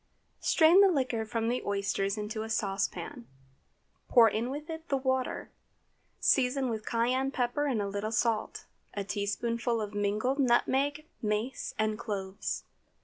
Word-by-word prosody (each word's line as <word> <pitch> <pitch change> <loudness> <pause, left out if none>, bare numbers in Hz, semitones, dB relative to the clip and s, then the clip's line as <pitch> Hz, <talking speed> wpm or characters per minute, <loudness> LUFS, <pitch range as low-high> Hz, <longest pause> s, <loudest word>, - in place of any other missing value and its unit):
Strain 335 +4 +6
the 400 - +8
liquor 255 -8 0
from 225 +1 -1
the 245 +2 0
oysters 200 0 -1
into 215 +1 -3
a 220 - -5
saucepan, 220 +4 -2 0.8
pour 235 -3 +7
in 225 +3 -1
with 295 +3 -5
it 325 0 -7
the 275 - +2
water. 260 -1 -1 0.7
Season 260 0 +2
with 220 -1 -5
cayenne 250 +3 +1
pepper 255 +2 0
and 230 -7 0
a - - -2
little 205 +2 -3
salt, 230 -1 0 0.3
a 200 - -2
teaspoonful 230 +4 -1
of 210 -1 -4
mingled 210 +7 0
nutmeg, 275 +4 +2 0.2
mace, 215 +4 -2
and 215 0 0
cloves. 200 -4 -4
230 Hz, 145 wpm, -30 LUFS, 210-265 Hz, 0.8 s, the